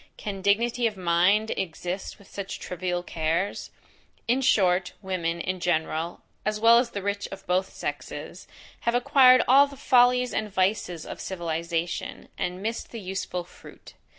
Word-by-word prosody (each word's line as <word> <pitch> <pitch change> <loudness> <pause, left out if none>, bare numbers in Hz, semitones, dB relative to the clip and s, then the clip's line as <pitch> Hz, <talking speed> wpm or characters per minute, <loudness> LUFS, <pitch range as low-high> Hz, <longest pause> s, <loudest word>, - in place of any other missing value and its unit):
Can 195 -2 -5
dignity 230 +4 +2
of 210 -3 -5
mind 185 +5 +3
exist 180 +1 -4
with 200 - -18
such 195 -1 -6
trivial 180 -1 -3
cares? 165 +4 -2 0.6
In 250 +3 +2
short, 185 -7 +3
women, 170 -3 -2
in 185 +2 -3
general, 165 -1 -1 0.2
as 215 0 -1
well 230 +1 +7
as 245 -1 0
the 200 - -5
rich 200 0 -2
of 195 0 -9
both 185 +2 0
sexes, - - -6 0.3
have 235 +1 0
acquired 255 0 +6
all 275 +3 +7
the 280 -1 -12
follies 250 0 +4
and 215 -1 -2
vices 185 -3 0
of - - -7
civilization, 170 -1 -3
and 180 +2 -3
missed 225 +2 -3
the 230 - -7
useful 185 -2 -4
fruit. 175 - -15
190 Hz, 150 wpm, -26 LUFS, 175-230 Hz, 0.6 s, well